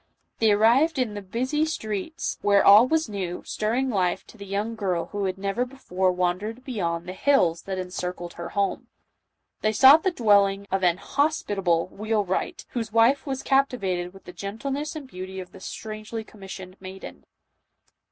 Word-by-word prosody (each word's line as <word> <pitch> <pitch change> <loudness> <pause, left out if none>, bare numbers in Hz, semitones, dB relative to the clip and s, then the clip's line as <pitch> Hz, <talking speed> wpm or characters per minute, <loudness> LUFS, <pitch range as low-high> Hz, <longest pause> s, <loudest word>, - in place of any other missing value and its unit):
They 220 -2 +4
arrived 240 +10 +4
in 250 -5 0
the 205 - -5
busy 255 +10 -1
streets, 315 - -3
where 200 -1 +4
all 210 +5 +8
was 320 +2 +1
new, 190 -4 -4
stirring 245 +5 -1
life, 185 -3 0
to - - -16
the 200 -2 -10
young 205 +4 -2
girl 185 -6 -2
who 205 -1 -2
had 190 0 -2
never 200 +5 -1
before 190 -8 -1
wandered 185 +7 -2
beyond 170 -9 -2
the 180 - -6
hills 185 -9 +2
that 190 -1 -3
encircled 180 -1 -5
her 170 0 -7
home. 200 -1 0 0.7
They 215 - +2
sought 275 +7 +8
the 375 - +2
dwell 210 - +4
ing 195 +1 -5
of 190 0 0
an 175 -1 +3
hospitable 200 - 0
wheelwright, 210 -2 -2
whose 225 -3 -4
wife 235 +6 +3
was 265 -1 -3
cap 275 0 +3
tivated 185 -7 -3
with 195 0 -16
the 180 - -11
gentleness 270 - -4
and 295 -4 -7
beauty 190 -3 -7
of 180 -1 -8
the - - -13
strangely 215 +3 -6
commissioned 190 -3 -10
maiden. 190 0 -9
205 Hz, 170 wpm, -25 LUFS, 185-250 Hz, 0.7 s, all